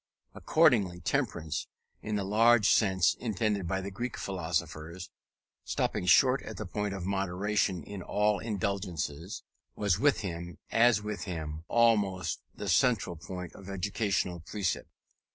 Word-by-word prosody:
Accordingly, 110 - +3
temperance, 80 -3 -2 0.3
in 105 - -3
the 100 - 0
large 110 +2 +4
sense 95 -4 +4
intended 105 -4 -1
by 95 +2 -1
the 100 +1 -5
Greek 120 +5 -4
philosophers 85 -1 -3 0.5
stopping 90 - -1
short 130 +6 +5
at 110 - -8
the 105 - -4
point 105 +2 -3
of 90 -2 -5
moderation 95 -1 0
in 100 +2 -7
all 105 +3 +1
indulgences 95 -4 -3 0.3
was 100 -3 +1
with 140 0 +3
him, 85 -3 -5
as 115 -2 +4
with 105 -1 -4
them, 80 -3 -5
almost 105 -6 +2
the - - -6
central 115 -8 +2
point 90 +2 -7
of 95 0 -11
educational 95 -2 -1
precept. 95 +3 -3
100 Hz, 135 wpm, -30 LUFS, 90-105 Hz, 0.5 s, short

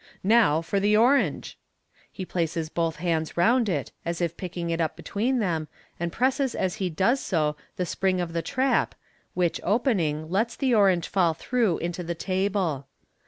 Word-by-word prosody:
"Now 195 -7 +4
for 195 +4 0
the 210 +2 +3
orange." 255 +5 +2 0.5
He 190 - -6
places 165 -2 -2
both 165 -1 -1
hands 160 -2 -2
round 230 +6 +3
it, 145 -8 -2
as 170 0 -3
if 170 -1 -1
picking 175 -2 -4
it 165 0 0
up 160 - -1
between 245 +6 -1
them, 165 -8 -1 0.3
and 170 0 -2
presses 260 +3 0
as 185 -2 -1
he 190 -2 -1
does 195 - +2
so 155 -8 0 0.2
the 180 - -1
spring 185 +1 0
of 170 -2 -3
the 165 - 0
trap, 260 +7 0 0.4
which 175 -2 0
opening, 175 - +1
lets 220 +7 0
the 265 -3 +1
orange 195 -5 +3
fall 175 -4 +2
through 230 -7 0
into 175 +1 -4
the 170 0 -4
table. 185 -6 -1
180 Hz, 170 wpm, -26 LUFS, 165-215 Hz, 0.5 s, Now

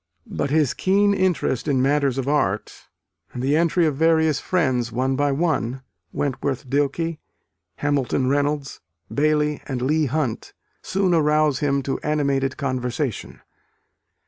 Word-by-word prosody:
But - - -1
his 150 -3 +2
keen 200 +2 +2
interest 185 - 0
in 140 -3 +2
matters 140 0 +1
of 135 -1 -2
art, 110 -9 -1 0.5
and 125 - -5
the 140 +3 +2
entry 170 +1 +2
of 150 -3 0
various 160 0 +3
friends 130 -9 0
one 130 +3 0
by 145 +1 +1
one 135 -4 -1 0.3
Wentworth 135 -1 -2
Dilke, 145 +4 -1 0.6
Hamilton 140 -2 0
Reynolds, 145 0 -1 0.3
Bailey 150 0 +1
and 130 -3 -3
Leigh 150 +3 +2
Hunt 130 -4 -2 0.3
soon 190 -2 0
arouse 150 -3 +2
him 140 -2 0
to 135 - -2
animated 140 -3 0
conversation. 130 -2 -3
145 Hz, 130 wpm, -22 LUFS, 135-155 Hz, 0.6 s, various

